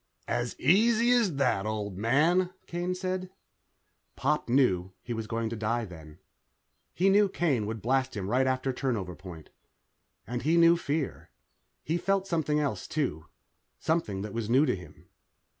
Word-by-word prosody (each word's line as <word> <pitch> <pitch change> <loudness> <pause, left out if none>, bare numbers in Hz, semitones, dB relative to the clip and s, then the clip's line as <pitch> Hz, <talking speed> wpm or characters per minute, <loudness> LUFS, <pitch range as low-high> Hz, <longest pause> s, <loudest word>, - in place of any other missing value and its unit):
"As 120 0 -2
easy 225 - +4
as 230 -10 +3
that, 110 -7 +1
old 105 -3 -3
man," 155 - +2 0.2
Kane 175 +1 -2
said. 185 0 -3 0.9
Pop 150 -2 0
knew 95 -8 +2
he 120 - -4
was 110 -1 -4
going 115 +1 -2
to - - -3
die 115 +2 -1
then. 80 -4 -12 0.8
He 185 - +2
knew 200 +1 +5
Kane 140 - 0
would 110 -2 -5
blast 130 0 0
him 95 -2 -3
right 130 +5 +2
after 130 0 0
turnover 110 -10 -2
point, 90 -4 -11 0.7
and 120 0 -4
he 160 +5 +2
knew 170 0 +7
fear. 155 -3 -3 0.5
He 165 +3 0
felt 195 +1 +1
something 155 -5 0
else, 145 -3 -2
too. 130 - -2 0.5
Something 110 - -1
that 105 - -6
was 115 -2 -3
new 130 +5 +5
to - - +1
him. 90 -1 -13
130 Hz, 160 wpm, -29 LUFS, 110-170 Hz, 0.9 s, knew